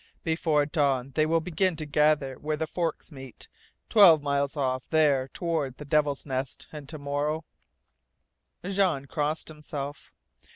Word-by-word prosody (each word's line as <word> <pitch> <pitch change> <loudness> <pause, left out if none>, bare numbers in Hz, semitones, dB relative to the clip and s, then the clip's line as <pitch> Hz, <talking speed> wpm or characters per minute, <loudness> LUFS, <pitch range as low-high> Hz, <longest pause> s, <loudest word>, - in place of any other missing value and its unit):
Before 160 -2 +1
dawn 140 -4 0
they 155 +3 +1
will 165 +1 +2
begin 180 +2 0
to 155 0 -4
gather 150 -2 +2
where 155 0 -2
the 160 - -1
forks 165 -1 -3
meet, 135 -3 -10 0.4
twelve 175 -9 +7
miles 140 0 0
off 130 -2 -1
there 145 -5 +3
toward 155 -4 -3
the 150 - -9
Devil's 145 -1 +1
Nest, 130 -2 -4
and 150 -3 -9
to 155 - -6
morrow 145 +2 -2 0.7
" - - -24
Jean 190 -8 +1
crossed 150 +3 -2
himself. 150 -2 -7
150 Hz, 150 wpm, -27 LUFS, 140-160 Hz, 0.7 s, twelve